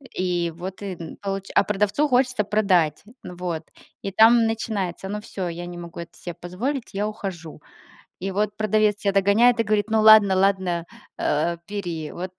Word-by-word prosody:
и 175 -2 -1
вот 185 +3 -7
и 195 -3 -5 0.2
получ 195 -1 -3
а - - +6
продавцу 210 +8 +1
хочется 255 -4 +2
продать, 185 -7 +1 0.2
ну 180 - -8
вот, 175 -2 -4 0.4
и 195 - -4
там 225 +3 +6
начинается: 205 -5 -3
"Ну 210 +1 -4
всё, 190 -3 -5
я 175 +1 -5
не 175 0 -8
могу 170 -1 -9
это 170 0 -11
себе 175 - -6
позволить, 225 - -4
я 205 +2 -1
ухожу". 180 -8 -7 0.6
И 195 +2 -3
вот 205 +1 -1
продавец 215 -1 +2
тебя 200 -1 0
догоняет 205 +5 +4
и - - +5
говорит: 215 -1 0
"Ну 220 0 +3
ладно 215 -3 +7
ладно, 185 -3 +1 0.3
а, 165 +3 0
бери, 175 -7 -4
вот". 180 +1 -6
195 Hz, 175 wpm, -23 LUFS, 175-215 Hz, 0.6 s, ладно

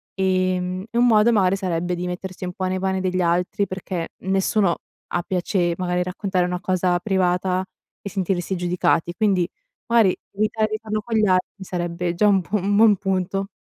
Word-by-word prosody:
Ehm, 185 -1 0
e 235 - -2
un 240 - +5
modo 220 0 +5
magari 195 -4 +3
sarebbe 180 -2 -1
di 175 +1 -4
mettersi 185 +1 -6
un 180 - -4
po' 190 -2 -3
nei 185 0 -1
pani 190 0 0
degli 185 0 0
altri 180 +3 +1
perché 185 -2 -4
nessuno 190 -1 +1 0.3
ha 175 - 0
piacere 180 -1 0
magari 180 -1 0
a - - +2
raccontare 185 0 -1
una 180 0 -2
cosa 180 -1 +1
privata 185 -1 +1 0.4
e 200 - -6
sentirsi 190 -1 -1
giudicati, 175 -1 +1
quindi 190 -5 +2 0.4
magari 230 -5 +4 0.2
evitare 215 +1 0
di 215 - -2
farlo 215 -1 -3
con 225 +1 -4
gli 215 - +4
altri 185 +1 0
sarebbe 175 -1 -2
già 210 +4 +3
un 195 -2 +4
buon 195 +2 -2
un 200 +1 +1
buon 215 0 +6
punto. 195 0 -1
185 Hz, 185 wpm, -22 LUFS, 180-200 Hz, 0.4 s, buon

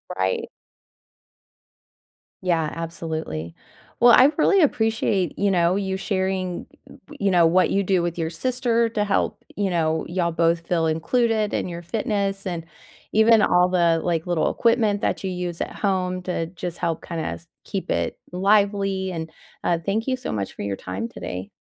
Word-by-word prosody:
Right. 95 0 -1 1.9
Yeah, 165 -4 0
absolutely. 160 - -5 0.4
Well, 240 0 +7
I 265 +3 +7
really 385 +4 +4
appreciate, 220 - +1
you 200 0 +3
know, 175 -1 +3
you 190 -1 -1
sharing, 190 -2 -2 0.2
y - - -14 0.2
you 200 -1 +2
know, 175 -2 +5
what 180 +2 +3
you 200 - +2
do 185 -2 +1
with 170 0 -2
your 165 -1 -1
sister 240 +2 0
to 215 -2 -1
help, 205 -1 -1
you 200 -2 0
know, 160 -2 0
y'all 175 -1 0
both 165 0 +1
feel 165 -2 +1
included 215 +7 +1
in - - -1
your 170 -1 -6
fitness, 200 +1 -2
and 175 -3 -3 0.5
even 220 +1 +5
all 180 -2 +4
the, 170 -2 +3
like, 170 -1 -1
little 175 -2 +1
equipment 220 -3 +2
that - - -1
you 190 - -2
use 180 -2 -4
at - - -3
home 185 -2 0
to 180 -2 -2
just 175 0 -6
help, 165 -2 -2
kinda 165 -2 -4
s 170 - -6 0.2
keep 195 - -5
it - - -1
lively, 195 0 +2
and, 160 -2 -5 0.3
uh, 170 -1 +1
thank 215 +6 -1
you 260 - +1
so 255 - -5
much 100 -3 -3
for - - -8
your 100 -1 -2
time 95 +4 -5
today. 95 -3 -6
180 Hz, 170 wpm, -23 LUFS, 165-205 Hz, 1.9 s, Well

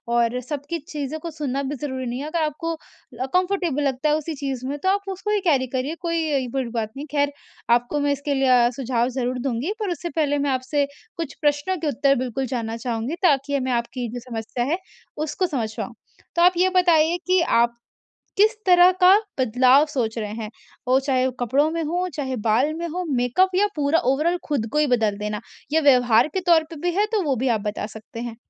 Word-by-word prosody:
और 235 +1 +2
सबकी 290 +5 -4
चीज़ों 295 0 -4
को 335 +1 -6
सुनना 280 -3 -3
भी 280 +2 -3
ज़रूरी 260 -2 -3
नहीं 245 +1 -3
है। 285 - -4
अगर 335 +1 -2
आपको 320 +2 -2
अ, 285 -4 -9
कम्फर्टेबल 360 -6 +1
लगता 275 +2 0
है 300 - +3
उसी 310 +1 -3
चीज़ 265 -3 -4
में 285 +1 -3
तो 375 - +3
आप 400 0 0
उसको 385 +3 -3
ही 420 - +2
कैरी 265 -6 +3
करिए 265 +5 -3
कोई 320 -6 0
अ, - - -6
बुरी 265 -2 -2
बात 225 -2 -3
नहीं। 290 - -5
खैर 285 -1 +1 0.4
आपको 245 +5 -1
मैं 285 0 +1
इसके 280 +1 -2
लिए 270 -1 +2
अ, 245 -1 +5
सुझाव 245 -2 0
ज़रूर 250 0 -2
दूँगी 265 - -2
पर 420 -3 -2
उससे 345 +1 -4
पहले 290 -2 +1
मैं 285 0 0
आपसे 265 +2 0 0.3
कुछ 330 -4 -4
प्रश्नों 295 +5 +1
के 315 -1 -3
उत्तर 275 0 +2
बिल्कुल 255 +2 -3
जानना 225 -1 -3
चाहूँगी 235 +5 -3
ताकि 285 -3 +3
हमें 260 -2 -1
आपकी 240 +1 -2
जो 245 - -4
समस्या 230 +1 -3
है - - +1 0.5
उसको 365 +5 -1
समझ 225 -8 -3
पाऊँ। - - -5 0.4
तो 340 - +2
आप 360 +1 +6
ये 370 +2 +4
बताइए 340 -2 +4
कि 370 -1 +4 0.2
आप 235 0 -3 0.6
किस 430 +3 +5
तरह 360 0 +7
का 365 +1 +8 0.3
बदलाव 255 +4 +5
सोच 235 -5 -2
रहे 210 -2 -3
हैं? 220 -2 -5 0.4
वो 260 +1 +4
चाहे 260 -2 +1
कपड़ों 270 +6 +2
में 330 0 -2
हो, 355 +4 -1
चाहे 265 -3 -2
बाल 255 +8 +3
में 340 +1 -4
हो, 360 +3 -3
मेकअप 285 +8 +2
या 410 +2 +4
पूरा 295 +2 +2
ओवरऑल 330 +6 +1
खुद 270 -7 -1
को - - +1
ही 300 - +3
बदल 220 -5 +1
देना? 210 +1 -4 0.3
या 320 - +4
व्यवहार 250 -3 +5
के 380 - 0
तौर 325 -1 +6
पे 330 - -8
भी 355 - +1
है 415 +1 +3
तो 430 -3 +1
वो 280 -3 +1
भी 255 +2 -1
आप 205 - -9
बता 210 0 -3
सकते 220 +1 -9
हैं। 235 -1 -5
280 Hz, 220 wpm, -23 LUFS, 245-325 Hz, 0.6 s, का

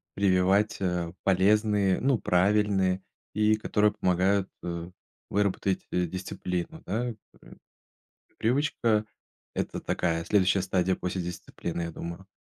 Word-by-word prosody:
прививать, 95 +1 +3
э, 90 -3 -1
полезные, 100 0 +3
ну, 135 -1 +3
правильные, 95 -1 +2 0.3
и 105 +1 +4
которые 105 -1 +2
помогают, 95 +2 +1
э, 85 0 -4 0.4
выработать, 100 -1 0
э, 90 0 +1
дисциплину, 90 - -4
да, 110 +6 -1
м. 115 - -7 1.2
Привычка- 115 -3 +1 0.5
это - - -3
такая 85 -1 -1
следующая 95 -1 +3
стадия 95 -1 +1
после 90 +1 -3
дисциплины, 85 0 -5
я 85 - -4
думаю. 85 +3 -7
95 Hz, 110 wpm, -28 LUFS, 90-105 Hz, 1.2 s, и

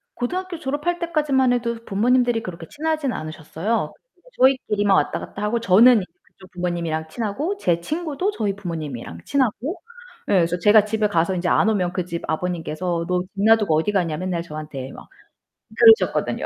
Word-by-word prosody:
고등학교 360 +8 -3
졸업할 295 +4 -2
때까지만 295 -7 +1
해도 235 -1 -1
부모님들이 240 +3 +2
그렇게 170 -4 -8
친하진 310 -3 -2
않으셨어요. 160 +7 -3
그러니까 - - -28
저희끼리만 210 -7 +3
왔다 - - 0
갔다 200 - -8
하고 230 +2 0
저는 230 +4 +6
이제 180 - -12
그쪽 185 -1 -19
부모님이랑 170 -3 -3
친하고 240 - -3
제 170 - 0
친구도 315 - -2
저희 205 - -2
부모님이랑 150 - -6
친하고. 265 - -1 0.5
에 - - +2
그래서 175 +2 -2
제가 210 +3 +5
집에 215 0 0
가서 170 0 +1
이제 180 0 -2
안 210 - +3
오면 185 -5 0
그 180 - -1
집 170 -1 -5
아버님께서 170 0 -2
"너 180 0 +1
집 185 - -17
놔두고 215 -7 +4
어디 165 +7 0
가냐?" 170 -6 0
맨날 180 -2 -2
저한테 150 -4 -7
막 - - -13 0.7
그러셨거든요. 445 +1 +4
205 Hz, 420 characters per minute, -22 LUFS, 170-260 Hz, 0.7 s, 저는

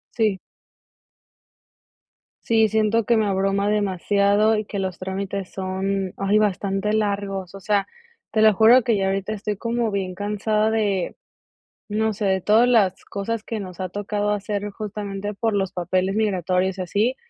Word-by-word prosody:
Sí. 215 -5 +1 2.0
Sí. 225 -1 +3
Siento 220 +1 +2
que 235 -1 +3
me 220 - +2
abruma 195 +1 +1
demasiado, 205 +1 +2
y 215 - -2
que 200 -1 -5
los 185 -2 -3
trámites 190 0 -4
son 190 0 -2
ay 195 +2 +2
bastante 200 0 0
largos. 200 -3 -2
O - - -8
sea, 200 0 0 0.4
te 215 - +2
lo 215 -1 +6
juro 230 +5 +6
que 230 -1 +2
ya 195 - 0
ahorita 195 +2 -1
estoy 210 -1 -4
como 230 0 -1
bien 190 -2 -2
cansada 210 +2 0
de 205 -5 0 0.7
No 220 +1 0
sé, 205 +1 -4
de 190 -1 +2
todas 220 +6 +4
las 210 -7 +2
cosas 215 +2 -4
que 225 -2 -4
nos 185 -2 -8
ha 185 -1 -4
tocado 205 +1 -2
hacer, 205 0 -2
justamente, 205 -1 -5
por 220 +1 -1
los 195 -1 0
papeles 185 +2 0
migratorios, 190 -2 0
y - - -1
así. 210 +8 0
205 Hz, 160 wpm, -23 LUFS, 195-215 Hz, 2.0 s, lo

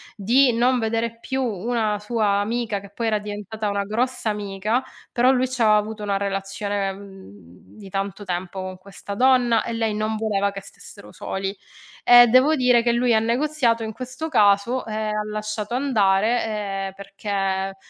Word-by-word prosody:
di 245 +6 +4
non 245 +2 +2
vedere 230 +1 -2
più 265 +2 -2
una 220 -1 -1
sua 210 -2 0
amica 220 -1 -2
che 200 0 -13
poi 230 +3 -4
era 215 -1 +1
diventata 210 +1 -5
una 200 0 -1
grossa 230 +2 -1
amica, 210 +4 -2 0.3
però 245 +2 +3
lui 255 0 +2
c'aveva 235 -4 +3
avuto 210 +1 -2
una 200 -1 0
relazione, 195 0 -2
mhmm, 145 - -15
di 200 -2 -11
tanto 195 +1 -4
tempo 180 0 -4
con 185 0 -6
questa 200 +1 -8
donna 245 0 +3
e 235 - -4
lei 225 -2 -1
non 215 +1 -1
voleva 200 -2 0
che 195 - -7
stessero 200 +1 -10
soli. 195 +1 -4 0.5
E 245 0 +9
devo 255 +6 +5
dire 250 -3 +4
che 235 0 +1
lui 240 0 +2
ha 220 - +5
negoziato 235 0 +1
in 220 - -4
questo 255 +7 -5
caso 210 +1 +3
e 215 - -5
ha 215 -1 -2
lasciato 215 +1 -4
andare, 225 -4 +2 0.4
ehm, 190 - -8
perché 195 -1 -3
215 Hz, 170 wpm, -23 LUFS, 200-240 Hz, 0.5 s, E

